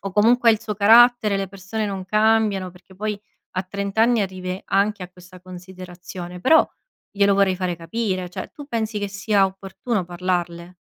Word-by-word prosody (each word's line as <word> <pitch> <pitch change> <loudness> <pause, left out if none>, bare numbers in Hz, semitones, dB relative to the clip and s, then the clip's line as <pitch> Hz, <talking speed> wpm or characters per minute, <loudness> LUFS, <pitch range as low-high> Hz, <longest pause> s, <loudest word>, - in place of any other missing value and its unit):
o 195 -1 -5
comunque 230 +3 +4
è - - +6
il 215 - -2
suo 215 -2 -4
carattere, 220 0 +5
le 195 -1 -3
persone 200 +3 -5
non 195 -2 -5
cambiano, 215 -2 +1
perché 180 +1 -19
poi 210 0 -3 0.4
a 185 - 0
30 200 +2 -5
anni 230 0 +4
arrivi 185 -1 -5
anche 200 0 +1
a 180 - -11
questa 180 0 -16
considerazione; 180 -1 -10
però 320 - +5 0.4
glielo 200 -1 +3
vorrei 195 -1 +3
fare 180 -2 -2
capire. 185 +2 -3
Cioè - - -7
tu 290 - -10
pensi 225 -5 -2
che 205 - -2
sia 200 0 +1
opportuno 195 +2 -4
parlarle? 175 0 -3
195 Hz, 175 wpm, -22 LUFS, 185-215 Hz, 0.4 s, è